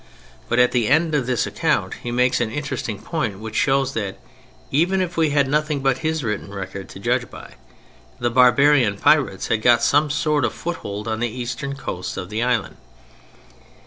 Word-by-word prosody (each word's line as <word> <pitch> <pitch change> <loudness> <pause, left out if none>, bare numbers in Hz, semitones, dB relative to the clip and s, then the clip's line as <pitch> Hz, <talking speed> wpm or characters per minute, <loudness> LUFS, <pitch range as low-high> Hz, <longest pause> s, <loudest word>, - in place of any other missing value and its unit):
But - - +1
at 125 0 +5
the 120 -4 +1
end 160 +4 +2
of 140 -5 0
this 125 -3 +1
account - - 0
he 120 - -5
makes 125 +1 +2
an 115 - 0
interesting 130 -5 -4
point 125 - -3
which 110 +2 -8
shows 135 -1 +2
that—even 145 - -3
if 185 -1 -2
we 160 -2 +2
had 140 -1 +2
nothing 150 0 0
but 135 -1 +1
his 160 -1 -1
written 105 -3 -3
record 95 -1 -7
to - - -10
judge - - 0
by—the 120 - -9
barbarian 125 -2 +4
pirates - - +2
had 110 - +1
got 120 +1 +4
some 145 +1 +3
sort 150 0 +1
of - - 0
foothold 105 -11 -5
on 110 0 -2
the 120 0 0
eastern 130 +3 -5
coasts 90 -9 -5
of 95 +1 -6
the 110 +2 -2
island. 120 -4 -1
125 Hz, 175 wpm, -21 LUFS, 110-145 Hz, -, at